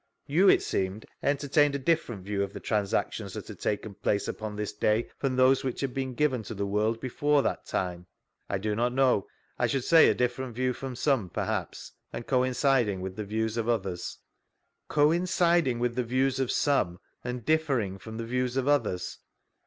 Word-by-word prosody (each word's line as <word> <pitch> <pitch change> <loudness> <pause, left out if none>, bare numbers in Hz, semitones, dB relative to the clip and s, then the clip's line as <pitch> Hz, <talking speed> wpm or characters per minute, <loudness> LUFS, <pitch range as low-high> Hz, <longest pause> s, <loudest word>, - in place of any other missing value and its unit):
You, 180 +7 +4
it - - +5
seemed, 95 +3 -2 0.2
entertained 145 0 +2
a - - +1
different 130 - 0
view 100 -1 -1
of 100 0 -2
the - - -6
transactions 105 -2 -1
that - - -6
had - - -9
taken 105 0 -2
{dace 100 -1 +1
upon 110 -1 -5
this 105 0 -3
day 105 +2 +1
from 135 -2 0
those 130 +1 +4
which 130 -2 -3
had 135 -2 -2
been 130 -2 -3
given 140 -4 +1
to 110 +1 -7
the 100 0 -2
world 105 +3 0
before 145 +3 +1
that - - -2
time 90 -1 -2 0.4
P— - - 0
I - - +1
do 105 +2 -2
not 120 +3 +1
know; 130 -6 +3 0.3
I - - +3
should 135 -3 -1
say 165 +3 +7
a - - +2
different 125 0 -1
view 130 +1 0
from 130 0 -6
some, 130 -7 +1
perhaps, - - -3 0.2
and 120 - -6
coinciding 125 -5 +2
with 95 0 -5
Uie 105 - -4
views 110 +2 -1
<rf 115 -1 -1
others. 95 -6 -2 0.7
Coinciding 170 -2 +3
with 120 0 -1
die 125 - +1
views 130 +2 0
of 130 -2 0
some, 100 -12 +1 0.2
and 125 -2 -5
differii^ 135 -12 +1
frcHn 110 0 -8
the 115 - -4
views 125 +1 -1
of 135 0 0
others 145 -11 0
125 Hz, 190 wpm, -28 LUFS, 105-135 Hz, 0.7 s, say